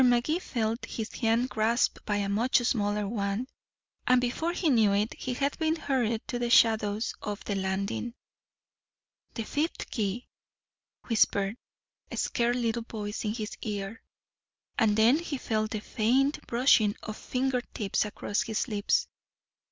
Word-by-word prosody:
Magee 250 Hz, +7 st, +3 dB
felt 230 Hz, -7 st, -2 dB
his 220 Hz, -1 st, -5 dB
hand 230 Hz, +1 st, +1 dB
grasped 225 Hz, +3 st, +1 dB
by 210 Hz, -, +1 dB
a 200 Hz, -1 st, 0 dB
much 220 Hz, +6 st, +2 dB
smaller 210 Hz, -4 st, 0 dB
one, 200 Hz, +2 st, -1 dB, 0.6 s
and 255 Hz, 0 st, +6 dB
before 250 Hz, +7 st, -1 dB
he 350 Hz, -1 st, -1 dB
knew 225 Hz, -8 st, +4 dB
it 210 Hz, +2 st, +1 dB
he 255 Hz, -1 st, -4 dB
had 280 Hz, +2 st, 0 dB
been 320 Hz, 0 st, +2 dB
hurried 245 Hz, -8 st, -1 dB
to 245 Hz, -, -3 dB
the 240 Hz, -1 st, -1 dB
shadows 220 Hz, -2 st, +3 dB
of 210 Hz, 0 st, -5 dB
the 205 Hz, -, -2 dB
landing. 195 Hz, +5 st, -2 dB, 1.2 s
"The 225 Hz, -, -2 dB
fifth 300 Hz, +8 st, -2 dB
key," 215 Hz, +2 st, -2 dB, 0.8 s
whispered 205 Hz, -3 st, +2 dB, 0.5 s
a -, -, -6 dB
scared 240 Hz, 0 st, +1 dB
little 235 Hz, -1 st, 0 dB
voice 215 Hz, -2 st, -5 dB
in 210 Hz, +1 st, -1 dB
his 215 Hz, -3 st, -4 dB
ear. 205 Hz, 0 st, -4 dB, 0.8 s
And 215 Hz, -2 st, +3 dB
then 235 Hz, +7 st, +5 dB
he 315 Hz, -4 st, -4 dB
felt 215 Hz, -3 st, -1 dB
the 215 Hz, -1 st, -3 dB
faint 260 Hz, +7 st, +1 dB
brushing 235 Hz, -4 st, +4 dB
of 215 Hz, -, -5 dB
finger 255 Hz, +1 st, -1 dB
tips 210 Hz, -4 st, -1 dB
across 210 Hz, 0 st, -2 dB
his 225 Hz, 0 st, -1 dB
lips. 235 Hz, -, +1 dB
225 Hz, 150 wpm, -29 LUFS, 210-250 Hz, 1.2 s, and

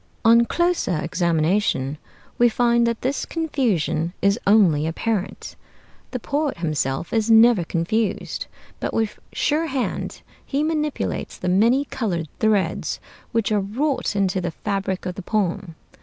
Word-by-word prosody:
On 235 Hz, +1 st, +6 dB
closer 345 Hz, -, +1 dB
examination 160 Hz, -3 st, 0 dB, 0.4 s
we 240 Hz, 0 st, +6 dB
find 235 Hz, +1 st, +2 dB
that 235 Hz, -1 st, -2 dB
this 265 Hz, +2 st, -1 dB
confusion 220 Hz, -, -1 dB
is 200 Hz, +3 st, +2 dB
only 180 Hz, -8 st, +4 dB
apparent. 200 Hz, +4 st, -3 dB, 0.5 s
The 250 Hz, -, -4 dB
poet 290 Hz, +4 st, -1 dB
himself 155 Hz, -3 st, -2 dB
is 225 Hz, -1 st, +1 dB
never 225 Hz, -3 st, +6 dB
confused, 190 Hz, +6 st, -1 dB, 0.3 s
but -, -, -3 dB
with 220 Hz, -2 st, -1 dB
sure 310 Hz, +2 st, 0 dB
hand 265 Hz, -4 st, -3 dB, 0.2 s
he 285 Hz, +1 st, -1 dB
manipulates 305 Hz, -2 st, -2 dB
the 180 Hz, -, -2 dB
many 230 Hz, +9 st, +3 dB
colored 175 Hz, -, -3 dB
threads 215 Hz, -3 st, +1 dB, 0.3 s
which 225 Hz, -2 st, 0 dB
are 210 Hz, -, +3 dB
wrought 245 Hz, +6 st, -1 dB
into 190 Hz, -2 st, +1 dB
the 175 Hz, -, -2 dB
fabric 195 Hz, +1 st, -3 dB
of 180 Hz, -, -2 dB
the 195 Hz, -, -7 dB
poem. 190 Hz, -3 st, -2 dB
210 Hz, 135 wpm, -22 LUFS, 175-240 Hz, 0.5 s, On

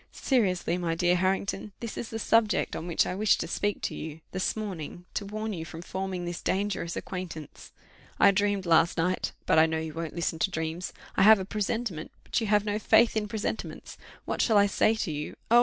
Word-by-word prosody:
Seriously, 185 Hz, -8 st, +1 dB
my 165 Hz, -2 st, -1 dB
dear 175 Hz, +1 st, +3 dB
Harrington, 190 Hz, +2 st, -1 dB
this 230 Hz, -2 st, -5 dB
is 230 Hz, -, -5 dB
the 225 Hz, -, -4 dB
subject 225 Hz, -1 st, +2 dB
on 170 Hz, -, -5 dB
which 170 Hz, -, +2 dB
I -, -, -2 dB
wished 210 Hz, +2 st, +3 dB
to -, -, -3 dB
speak 205 Hz, +4 st, -1 dB
to -, -, -1 dB
you 160 Hz, 0 st, -7 dB
this 185 Hz, -, -1 dB
morning, 180 Hz, -5 st, -6 dB
to 200 Hz, -, -3 dB
warn 215 Hz, +1 st, -3 dB
you 165 Hz, -4 st, -4 dB
from 165 Hz, +1 st, -8 dB
forming 190 Hz, -1 st, -4 dB
this 175 Hz, 0 st, -4 dB
dangerous 190 Hz, -3 st, -1 dB
acquaintance. 170 Hz, -5 st, -7 dB, 0.5 s
I -, -, +7 dB
dreamed 200 Hz, -1 st, 0 dB
last 165 Hz, +1 st, +4 dB
night 180 Hz, +3 st, 0 dB
but -, -, +4 dB
I 160 Hz, -, +6 dB
know 160 Hz, 0 st, -1 dB
you 160 Hz, -1 st, -4 dB
won't 165 Hz, 0 st, -5 dB
listen 170 Hz, -1 st, -2 dB
to 195 Hz, -, +2 dB
dreams; 160 Hz, 0 st, -3 dB, 0.3 s
I -, -, +4 dB
have 215 Hz, +2 st, +9 dB
a 190 Hz, -, -4 dB
presentiment 210 Hz, -4 st, -2 dB
but -, -, -1 dB
you 220 Hz, -, -1 dB
have 210 Hz, 0 st, +3 dB
no 210 Hz, 0 st, -1 dB
faith 230 Hz, +2 st, +4 dB
in 215 Hz, -1 st, 0 dB
presentiments: 215 Hz, +1 st, -4 dB, 0.3 s
what -, -, -1 dB
shall 220 Hz, -3 st, +4 dB
I 200 Hz, -, +6 dB
say 215 Hz, +2 st, +2 dB
to 215 Hz, -6 st, -2 dB
you? 150 Hz, 0 st, -5 dB, 0.2 s
Oh! 240 Hz, -, +8 dB
190 Hz, 215 wpm, -28 LUFS, 165-210 Hz, 0.5 s, have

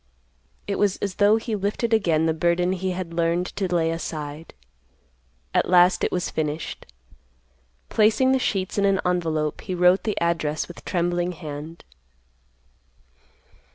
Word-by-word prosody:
It 200 Hz, -, -3 dB
was 200 Hz, -2 st, +2 dB
as 200 Hz, -2 st, -3 dB
though 205 Hz, +1 st, +5 dB
he 225 Hz, 0 st, -2 dB
lifted 210 Hz, +3 st, -1 dB
again 165 Hz, -7 st, +2 dB
the 160 Hz, -, +2 dB
burden 170 Hz, +2 st, +1 dB
he 190 Hz, 0 st, -2 dB
had 180 Hz, -2 st, -4 dB
learned 170 Hz, +1 st, +1 dB
to 195 Hz, -, -1 dB
lay 165 Hz, -2 st, +2 dB
aside. 155 Hz, -1 st, -6 dB, 1.0 s
At -, -, +2 dB
last 180 Hz, 0 st, +5 dB
it -, -, +1 dB
was 180 Hz, -, -2 dB
finished. 155 Hz, 0 st, -4 dB, 1.0 s
Placing 225 Hz, +5 st, +3 dB
the 265 Hz, -, +3 dB
sheets 195 Hz, -4 st, -1 dB
in 200 Hz, -, +3 dB
an 195 Hz, -1 st, +3 dB
envelope, 160 Hz, -4 st, -1 dB
he 185 Hz, -, -4 dB
wrote 180 Hz, +2 st, +4 dB
the 215 Hz, -, -2 dB
address 165 Hz, -3 st, -1 dB
with 175 Hz, -, -12 dB
trembling 175 Hz, 0 st, 0 dB
hand. 155 Hz, +1 st, -8 dB
175 Hz, 145 wpm, -24 LUFS, 165-195 Hz, 1.0 s, though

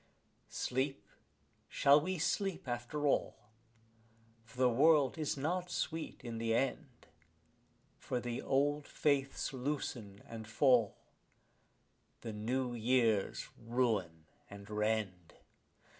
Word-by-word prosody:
Sleep, 135 Hz, +2 st, -2 dB, 0.6 s
shall 140 Hz, +2 st, +5 dB
we 185 Hz, +4 st, -2 dB
sleep 190 Hz, +1 st, -1 dB
after 120 Hz, +5 st, -3 dB
all? 140 Hz, -, +1 dB, 1.1 s
for 115 Hz, +2 st, -18 dB
the 130 Hz, 0 st, +4 dB
world 140 Hz, +2 st, +4 dB
is 150 Hz, -2 st, -1 dB
not 175 Hz, +6 st, -1 dB
sweet 165 Hz, -2 st, -3 dB
in 115 Hz, -2 st, -5 dB
the 115 Hz, 0 st, +1 dB
end; 135 Hz, 0 st, -2 dB, 0.9 s
For 125 Hz, -, -2 dB
the 120 Hz, 0 st, -4 dB
old 145 Hz, +2 st, +1 dB
faiths 140 Hz, -1 st, 0 dB
loosen 125 Hz, -7 st, -4 dB
and 110 Hz, -2 st, -8 dB
fall, 120 Hz, -2 st, +3 dB, 1.2 s
the 115 Hz, -, -5 dB
new 120 Hz, +4 st, -2 dB
years 115 Hz, -3 st, +1 dB
ruin 110 Hz, -9 st, -1 dB, 0.2 s
and 100 Hz, 0 st, -10 dB
rend. 105 Hz, -5 st, -2 dB
125 Hz, 105 wpm, -34 LUFS, 115-145 Hz, 1.2 s, shall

